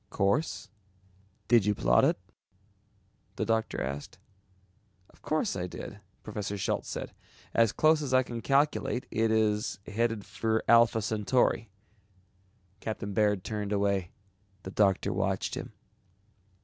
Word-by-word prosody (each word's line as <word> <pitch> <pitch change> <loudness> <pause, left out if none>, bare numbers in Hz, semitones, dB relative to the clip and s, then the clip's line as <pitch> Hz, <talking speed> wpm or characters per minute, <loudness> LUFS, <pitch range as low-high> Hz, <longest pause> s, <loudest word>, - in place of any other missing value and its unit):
"Course? 105 +11 0 0.8
Did 115 -4 +4
you 105 - +2
plot - - +3
it?" - - +3 1.2
The - - -1
doctor 110 0 0
asked. 70 +2 -5 0.9
"Of - - -25
course 155 +7 -1
I 90 -1 -3
did," 85 - -8 0.2
Professor 100 -1 -4
Schultz 95 - -2
said, - - -5 0.4
"as 115 -2 +4
close 155 0 +3
as 140 -3 -3
I 130 0 +5
can 120 -2 -6
calculate 140 -2 +1
it 115 0 +1
is 110 0 +1
headed 115 0 -1
for 110 0 -1
Alpha 115 -2 +5
Centauri." 110 +1 +1 1.1
Captain 105 -2 -4
Baird 105 -2 +2
turned 105 -2 -4
away. 100 -3 +1 0.5
The 95 - -7
doctor 100 -2 +2
watched 95 0 -1
him. - - -5
110 Hz, 125 wpm, -29 LUFS, 100-115 Hz, 1.2 s, I